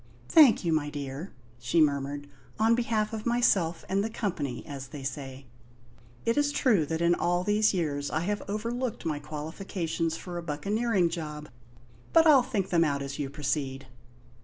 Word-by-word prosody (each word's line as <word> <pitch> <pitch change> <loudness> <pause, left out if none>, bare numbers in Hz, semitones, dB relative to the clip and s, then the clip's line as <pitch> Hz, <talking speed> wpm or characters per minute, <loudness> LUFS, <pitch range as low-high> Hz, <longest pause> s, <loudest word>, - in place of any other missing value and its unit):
"Thank 290 - +6
you, 165 - +2
my 150 -2 0
dear," 145 +4 -6 0.3
she 120 +8 +1
murmured; 145 -1 +1 0.3
"on 225 +1 +4
behalf 225 -2 0
of 220 +1 -4
myself 200 -9 +2
and 195 +1 +1
the 220 - -2
company, 165 - -3
as 135 -2 -7
they 135 +2 -9
say. 135 0 -6 0.8
It 230 +5 +2
is 290 0 +2
true 220 - +2
that 160 +1 -2
in 170 0 +4
all 175 +1 +1
these 210 +2 +3
years 145 -6 -1
I 155 - -1
have 205 +4 -1
overlooked 230 +2 -3
my 155 -3 -1
qualifications 160 +2 -3
for 175 -1 -6
a - - -7
buccaneering 195 +5 0
job; 150 -3 -6 0.6
but 330 0 +6
I'll 295 -5 +7
think 200 -5 -2
them 170 -2 +4
out 140 -3 0
as 140 +1 -6
you 140 -2 -2
proceed." 140 -1 -2
165 Hz, 170 wpm, -28 LUFS, 145-210 Hz, 0.8 s, I'll